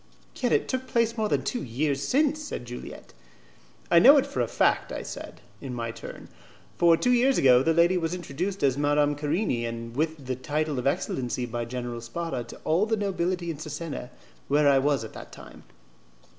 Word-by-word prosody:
"Yet 245 -2 -1
it - - +2
took 260 0 -3
place 230 -1 +1
more 215 -2 -1
than - - +1
two 245 - -2
years 140 +3 -1
since," 295 - +1
said 295 - -6
Juliette. 120 +1 -9 0.8
"I 170 - +8
know 275 - +8
it 275 - +3
for 280 - -3
a - - 0
fact," - - +1
I - - -4
said, - - -8 0.2
in 130 -3 -5
my 115 -1 -3
turn; - - -10 0.5
"for, 170 -1 +6
two 250 +10 +1
years 250 +2 +4
ago, 125 -2 +6
the 165 - +2
lady 170 +3 +4
was 165 +1 -2
introduced 180 +3 -4
as 135 0 +2
Madame 145 0 +2
Querini 145 - -1
and 115 0 -5
with 155 -1 -2
the 130 0 -2
title 150 +2 -2
of 125 - -1
excellency 125 -3 -1
by 120 0 -4
General 120 -1 -5
Spada 130 +1 -4
to 120 - -11
all 170 +7 +2
the 220 -1 +1
nobility 180 -3 -1
in 155 - -7
Cesena, 155 -4 -6 0.4
where 145 +1 +3
I 140 -1 +5
was 140 -2 +1
at 110 - -9
that - - -10
time." - - -13
150 Hz, 200 wpm, -26 LUFS, 130-185 Hz, 0.8 s, I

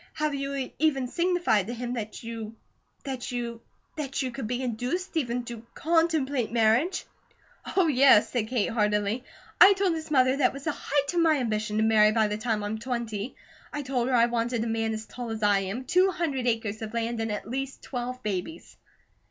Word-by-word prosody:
Have 305 -1 0
you 275 -1 -3
even 275 -4 +2
signified 345 - +1
to 240 - -4
him 245 +1 -4
that 220 -2 -5
you 225 -1 -6 0.5
that 260 -3 -5
you 235 -2 -4 0.4
that 275 -2 -2
you 255 - -2
could 235 -2 -5
be 250 +2 -2
induced, 255 - -3
even 245 -5 0
to 235 -2 -7
CONTEMPLATE 315 -7 +1
marriage?" 235 - +2 0.7
"Oh, 375 - +5
yes," 270 -7 +5
said 230 -4 -1
Kate, 240 -3 0
heartily. 210 +1 0 0.4
"I 400 - +10
told 385 -2 +1
his 320 -1 -5
mother 260 -2 +3
that 280 - +4
it - - -6
was 275 0 -8
the 305 - 0
height 285 +1 -1
of 350 - +1
my 325 -2 +4
ambition 215 -4 -1
to 220 - +3
marry 215 -1 +5
by 220 -1 +3
the 210 0 -2
time 220 -2 -1
I'm 215 +1 -3
twenty. 235 -2 -4 0.4
I 290 - -4
told 255 -2 -1
her 260 - +2
I 235 -1 +6
wanted 235 0 -1
a - - -2
man 225 0 0
as 220 0 -6
tall 245 0 -7
as 220 -1 -4
I 205 -1 +4
am, 195 +7 -4
two 365 +7 +4
hundred 290 -9 -2
acres 225 -2 -1
of 220 +1 -6
land, 230 0 -1
and 225 -1 -1
at 210 - -4
least 270 +3 -4
twelve 250 0 -5
babies." 210 - -4
245 Hz, 200 wpm, -27 LUFS, 220-275 Hz, 0.7 s, I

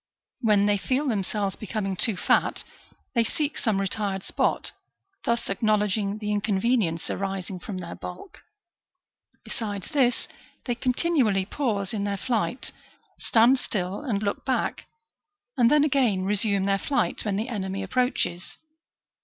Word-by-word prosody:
When 210 -4 +4
they 205 -1 +3
feel 270 +8 0
themselves 200 -3 -1
becoming 205 -2 -3
too 210 +1 +3
fat, - - +2 0.5
they 235 -2 +4
seek 290 +6 -1
some 220 -6 +1
retired 195 0 -2
spot, - - 0 0.5
thus 235 0 0
acknowledging 210 -1 +1
the 210 -1 -3
inconvenience 205 -4 +1
arising 190 -1 -3
from 190 +1 -6
their 170 -2 -6
bulk. 180 - -9 1.0
Besides 205 -5 -5
this, 255 -5 +2 0.4
they 245 - 0
continually 250 - +1
pause 205 -5 -1
in 205 -2 -1
their 200 -1 -1
flight, 240 +3 -1 0.5
stand 240 +4 +4
still 190 -1 -3
and 220 -8 -1
look 200 - -1
back, 260 -1 -1 0.7
and 235 -2 +5
then 295 +1 +5
again 250 -10 +2
resume 200 -1 +2
their 195 0 +2
flight 285 +6 0
when 205 -2 -1
the 220 +5 -2
enemy 195 -3 -3
approaches. 195 -5 -1
210 Hz, 135 wpm, -26 LUFS, 195-240 Hz, 1.0 s, and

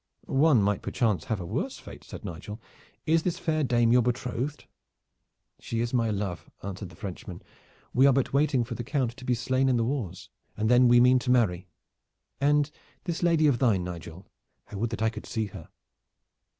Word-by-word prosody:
"One 135 -5 +4
might 100 -1 +1
perchance 110 -6 0
have 110 -3 -2
a 90 - -5
worse - - -3
fate," - - -12
said - - -10
Nigel. 95 +6 -7 0.5
"Is 160 +1 +3
this 175 0 -1
fair 155 -2 0
dame 120 -3 +3
your 125 +1 +6
betrothed?" 125 +4 -2 0.9
"She 115 - -4
is 120 +1 -1
my 115 -2 +2
love," 100 -4 -3
answered 95 0 -6
the - - -15
Frenchman. 90 -2 -8 0.5
"We 130 +3 +6
are - - +6
but 135 0 0
waiting 140 -3 +3
for 120 +1 -6
the 120 - -5
Count 125 -2 -1
to 125 - -10
be 125 - +2
slain 130 +3 +1
in 125 - +3
the 115 - +2
wars, 95 - -4 0.3
and 110 +1 0
then 125 0 +6
we 120 0 +6
mean 125 +1 +6
to 125 - -4
marry. 95 -8 +2 0.7
And 145 +1 +2 0.3
this 170 -2 -3
lady 165 -3 +3
of 140 -6 +3
thine, 105 -8 +2
Nigel? 90 +1 -8 0.5
I - - -7
would 110 +4 -1
that 115 -1 -3
I 110 - +3
could - - -9
see 110 -1 -1
her." 85 -5 -10
120 Hz, 195 wpm, -27 LUFS, 105-135 Hz, 0.9 s, your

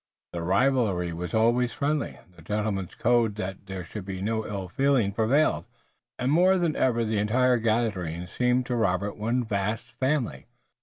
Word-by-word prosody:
The 85 - -3
rivalry 95 -2 +1
was 85 +2 -4
always 120 +2 +2
friendly, 145 - -1 0.2
the 80 - -15
gentlemen's 105 -1 -2
code 120 -3 +2
that 95 -1 -6
there 95 -1 -5
should 100 +4 -7
be 95 -1 -5
no 110 +2 -2
ill 100 -3 -4
feeling 135 -1 +2
prevailed, 120 +9 +2 0.5
and 125 +2 0
more 185 +4 +5
than 170 -4 0
ever 120 -3 +1
the 110 -1 0
entire 125 +4 +3
gathering 105 -7 -1
seemed 125 +6 +1
to 125 - -2
Robert 100 -2 0
one 115 +4 0
vast 110 +2 -2
family. 130 -4 -1
110 Hz, 160 wpm, -26 LUFS, 95-125 Hz, 0.5 s, more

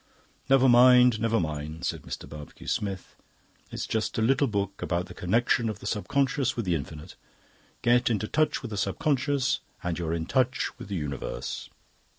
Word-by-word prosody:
"Never 135 -1 +6
mind, 125 -1 +7
never 115 0 +2
mind," 75 0 -4
said - - -2
Mr. - - -7
Barbecue 75 0 -11
Smith. 95 -3 -3 0.6
"It's - - -4
just 110 -1 -2
a - - +1
little 135 +4 +3
book 100 -3 -2
about 90 0 -1
the 90 - -11
connection 115 +5 +1
of 105 - -4
the - - -12
Subconscious 135 +4 0
with 115 - -2
the 90 - +1
Infinite. 75 +2 -6 0.7
Get 120 +1 +4
into 105 -2 0
touch 155 +2 +1
with 120 - -6
the 105 - -4
Subconscious 140 +2 0 0.2
and 90 -1 -2
you 85 - -3
are 80 - -1
in 80 -1 -3
touch 130 +5 0
with - - -8
the 100 - -4
Universe. 75 -5 -4
110 Hz, 175 wpm, -27 LUFS, 90-125 Hz, 0.7 s, mind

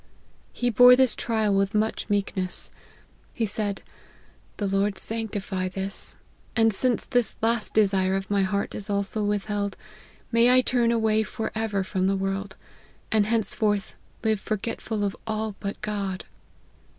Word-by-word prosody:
He 245 0 -1
bore 245 +3 +8
this 260 -2 +4
trial 220 -3 0
with 195 +2 +1
much 215 +1 0
meekness: 195 -2 -2 0.6
he 230 - 0
said, 205 -1 -3 0.4
" - - -32
The 205 - -2
Lord 195 +1 +1
sanctify 205 -4 -3
this: 190 +1 -4 0.4
and 225 -1 +4
since 245 +3 +1
this 245 -2 0
last 230 0 0
desire 195 -3 +3
of 195 +1 -4
my 200 -1 +3
heart 200 +1 -1
is 205 - -1
also 200 +1 -1
withheld, 205 -1 -1 0.5
may 230 +1 +5
I 255 0 +6
turn 240 -2 +2
away 220 -2 +2
for 220 0 -4
ever 215 -3 -1
from 190 -1 0
the 195 - +2
world, 195 0 -3 0.5
and 215 -2 +3
henceforth 215 -2 +1 0.3
live 220 -2 +2
forgetful 215 +1 -3
of 200 -1 -1
all 220 -1 -2
but 200 0 -4
God. 200 -3 -3
210 Hz, 150 wpm, -26 LUFS, 195-225 Hz, 0.6 s, bore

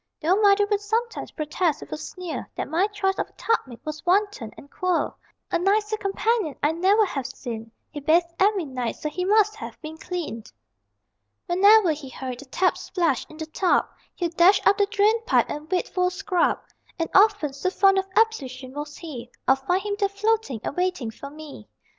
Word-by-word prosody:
Though 340 +4 +2
mother 405 0 +5
would 410 0 0
sometimes 450 +3 -2
protest 305 0 -1
with - - -11
a - - -3
sneer 360 +2 -6
That - - -2
my 355 +5 +1
choice 410 -2 -1
of - - -2
a - - -29
tub 455 0 +1
mate 240 -3 -12
was 305 0 -5
wanton 375 - +1
and 280 - -12
queer, 365 -2 0 0.4
A - - +2
nicer 420 +4 +2
companion 410 - 0
I 295 - +4
never 385 +6 +3
have 275 -8 -3
seen: 230 -4 -7 0.2
He 295 - -6
bathed 335 +4 +2
every 390 -3 +3
night, 255 -4 -3
so 305 - -4
he 360 +4 -3
must 425 +1 +3
have - - -8
been 315 +1 -8
clean. 335 - -4 1.0
Whenever 390 +1 +5
he 295 -3 -6
heard 255 -1 -6
the 285 - -10
tap 365 +7 +1
splash 335 -9 -1
in 310 - -13
the 315 - -4
tub 345 +4 +2 0.3
He'd 340 -2 -3
dash 360 +4 +6
up 400 - +4
the 405 - +3
drain 425 +3 +2
pipe - - +4
and 300 +2 -6
wait 365 -1 0
for 360 0 0
a - - +2
scrub, 365 -1 0 0.4
And 330 - -1
often, 400 -8 +4
so 280 +7 -1
fond 390 0 +4
of 380 - -3
ablution 265 - 0
was 295 +1 -6
he, 255 -8 -8 0.2
I'd 265 0 +4
find 360 +8 0
him 410 -1 -2
there 400 -2 +2
floating 410 - -1
and - - -4
waiting 360 -10 -1
for 280 +5 -9
me. 305 0 -11
360 Hz, 200 wpm, -24 LUFS, 295-405 Hz, 1.0 s, dash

